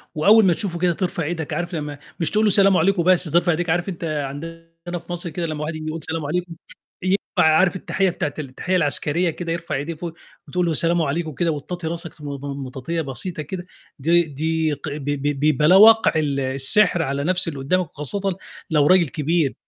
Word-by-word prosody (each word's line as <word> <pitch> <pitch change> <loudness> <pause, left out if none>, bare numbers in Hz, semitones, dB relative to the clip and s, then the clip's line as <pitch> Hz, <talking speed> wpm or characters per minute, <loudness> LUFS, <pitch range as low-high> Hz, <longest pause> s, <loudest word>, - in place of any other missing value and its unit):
وأول 210 +7 +6
ما 175 - +4
تشوفه 180 -5 -4
كده 175 0 +2
ترفع 175 -1 -2
إيدك، 160 -1 -4
عارف 175 +3 -3
لمّا 150 -2 -5 0.2
مش 165 - 0
تقول 215 +1 +2
له 210 - +4
سلام 195 -1 +5
عليكم 180 +1 +2
بس 185 0 +4
ترفع 175 +2 +2
إيديك، 170 +1 -1
عارف 175 +3 0
أنت 175 -2 -7
عندنا 165 +4 -6
في 170 +1 -12
مَصر 175 0 -4
كده 170 +2 -3
لمّا 155 -1 -4
واحد 155 +1 -4
يقول 155 +1 -5
سلام 160 -2 -3
عليكم، 175 +2 -3 0.5
ينفع 185 -3 +2
عارف 185 +2 +3
التحية 190 +1 0
بتاعة 150 -4 -3
ال 150 - -3
التحية 180 +8 -2
العسكرية 165 +1 +1
كده، 165 +1 -5
يرفع 165 0 -3
إيديه 145 +5 -3
فوق، 165 +1 -7 0.3
وتقول 180 +5 0
له 165 - 0
سلام 170 +2 +2
عليكم 160 +2 -1
وكده 165 +3 -1
وتطاطي 160 +3 -5
راسك 170 -1 -6
م - - -9
م 140 -1 -5
مطاطية 135 +6 -4
بسيطة 155 +4 -4
كده، 175 +4 -6 0.3
دي 170 +5 +4
دي 160 +1 -1
ق 145 +2 -6
ب 150 - -8
ب 145 +1 0
بلا 155 +5 +5
وَقع 225 +3 +7
ال 145 -3 0
السحر 135 +8 +3
على 140 -2 -2
نفس 185 +3 +1
اللي 145 -4 -4
قدّامك 175 +5 0
وخاصةً 190 +6 -2 0.3
لو 150 -3 +3
راجل 180 -3 +4
كبير 155 0 0
165 Hz, 205 wpm, -22 LUFS, 150-175 Hz, 0.5 s, وَقع